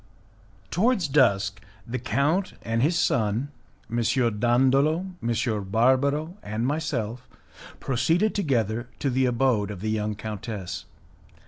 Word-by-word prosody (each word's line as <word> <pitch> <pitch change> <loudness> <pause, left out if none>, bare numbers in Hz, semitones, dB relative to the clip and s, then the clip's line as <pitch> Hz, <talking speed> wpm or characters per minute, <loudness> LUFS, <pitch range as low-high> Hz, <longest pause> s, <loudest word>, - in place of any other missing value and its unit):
Towards 205 -2 +2
dusk, 100 -8 +2 0.2
the 125 +1 -4
count 140 - 0
and 115 0 0
his 165 +6 +2
son, 115 +1 +1 0.4
M. 115 - -3 0.4
Dandolo, 135 - +3 0.2
M. 115 -2 -1
Barbaro, 140 - +2
and 110 +3 -3
myself, 125 -5 -2 0.5
proceeded 160 - +1
together 120 - 0
to 140 - -1
the 130 +1 +2
abode 120 -4 +1
of 100 -3 -7
the 110 +1 -1
young 105 -1 -1
countess. 105 -2 -6
125 Hz, 115 wpm, -25 LUFS, 110-145 Hz, 0.5 s, Dandolo